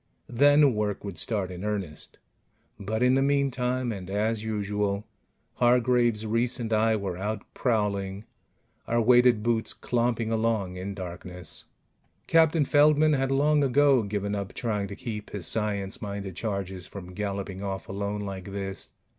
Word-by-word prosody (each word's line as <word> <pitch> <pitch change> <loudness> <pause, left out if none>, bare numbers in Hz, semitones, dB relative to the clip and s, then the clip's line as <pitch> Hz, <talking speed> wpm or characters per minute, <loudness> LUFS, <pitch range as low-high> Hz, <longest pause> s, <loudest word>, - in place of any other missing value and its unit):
Then 145 +2 +5
work 105 -1 -2
would 100 -5 -5
start 100 -5 -1
in 90 +1 -7
earnest. 100 -7 -4 0.6
But 110 +4 -1
in 125 0 +5
the 135 - +3
meantime 130 -3 +1
and 95 -4 -6
as 105 +2 0
usual 105 -1 -1 0.5
Hargraves, 120 -2 +3
Reiss 115 +3 0
and 115 -2 -2
I 110 +1 +3
were 95 -4 -3
out 105 +2 -3
prowling, 100 -4 -1 0.6
our 120 +1 +1
weighted 120 -1 +5
boots 115 -1 0
clomping 115 -2 0
along 110 -5 0
in 95 +2 -5
darkness. 90 -2 -7 0.6
Captain 160 -2 +4
Feldman 150 +2 +5
had 135 -1 +1
long 145 +2 +3
ago 140 -1 +4
given 100 -1 -2
up 100 -1 -4
trying 105 -4 -1
to 100 - -7
keep 110 -3 -6
his 100 -4 -6
science 100 -3 -2
minded 100 -3 -5
charges 95 -4 -4
from 90 -2 -9
galloping 100 -1 -4
off 95 -1 -4
alone 100 +1 -3
like 95 -2 -6
this. 95 -1 -5
105 Hz, 145 wpm, -27 LUFS, 100-125 Hz, 0.6 s, Then